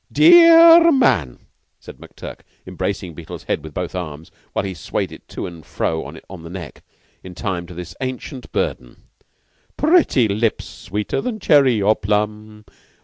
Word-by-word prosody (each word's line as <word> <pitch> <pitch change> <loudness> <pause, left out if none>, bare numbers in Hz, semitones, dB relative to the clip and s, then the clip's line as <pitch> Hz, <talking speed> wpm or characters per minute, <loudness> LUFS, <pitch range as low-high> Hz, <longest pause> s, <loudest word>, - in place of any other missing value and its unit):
"Dear 335 0 +7 0.2
r 335 0 +5
man" 115 - +1 0.3
said - - -13
McTurk, - - -11 0.3
embracing 95 -3 -4
Beetle's 80 0 -10
head - - -3
with 80 -2 -11
both 90 -1 -4
arms, 80 -3 -7 0.2
while - - -2
he 95 - -4
swayed 85 - -4
it - - -14
to - - -6
and 85 -2 -10
fro 80 +3 -3
on 95 -3 -11
the 85 - -10
neck, 85 -5 -9 0.4
in 90 -1 -11
time 85 -1 -4
to 90 - -11
this 85 0 -9
ancient 130 0 -6
burden 60 - -4 0.7
"Pretty 300 - +3
lips 110 +2 -1
sweeter 105 +3 -4
than 240 -4 -4
cherry 135 - +3
or 105 +2 +3
plum. 105 +1 -3
100 Hz, 155 wpm, -19 LUFS, 85-130 Hz, 0.7 s, Dear